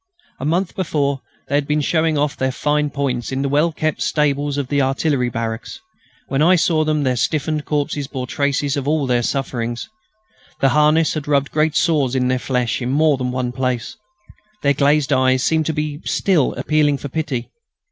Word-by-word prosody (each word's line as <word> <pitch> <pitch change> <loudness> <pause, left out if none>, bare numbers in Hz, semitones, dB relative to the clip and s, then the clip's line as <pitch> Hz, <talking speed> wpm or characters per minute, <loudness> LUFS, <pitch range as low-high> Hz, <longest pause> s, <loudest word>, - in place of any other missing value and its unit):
A 130 - -4
month 175 +4 0
before 145 -6 -1 0.3
they - - -5
had 145 0 +1
been 150 0 +1
showing 160 +1 +1
off 145 0 0
their 130 0 -1
fine 150 +2 0
points 135 -4 -2
in 135 +1 -1
the - - 0
well 150 +4 +2
kept 155 -1 -2
stables 145 -1 0
of 140 -3 -2
the 140 +1 +1
artillery 135 -1 +1
barracks. 115 0 -4 0.5
When 135 +1 0
I 175 +4 +6
saw 160 -1 +2
them 155 -1 0
their 130 -2 +1
stiffened 150 +4 -1
corpses 145 -1 -1
bore 130 -3 -5
traces 140 +2 0
of 140 -1 -3
all 150 -1 +1
their 125 -2 +1
sufferings. 120 - -3 0.7
Their 135 - +3
harness 150 +3 +3
had 150 -2 -4
rubbed 140 -1 +1
great 155 0 +1
sores 150 -7 +2
in 125 -1 +1
their 130 0 +1
flesh, 125 -2 -1
in 120 - -2
more 150 +2 +3
places 130 -1 -4
than 125 0 -3
one. 125 -2 +1 0.8
Their 140 0 +4
glazed 145 +1 +2
eyes 130 0 +3
seemed 160 -1 +1
to 160 - 0
be 150 0 -3
still 175 -9 +1
appealing 150 -2 +1
for 145 - -6
pity. 140 -5 -3
145 Hz, 190 wpm, -20 LUFS, 130-155 Hz, 0.8 s, I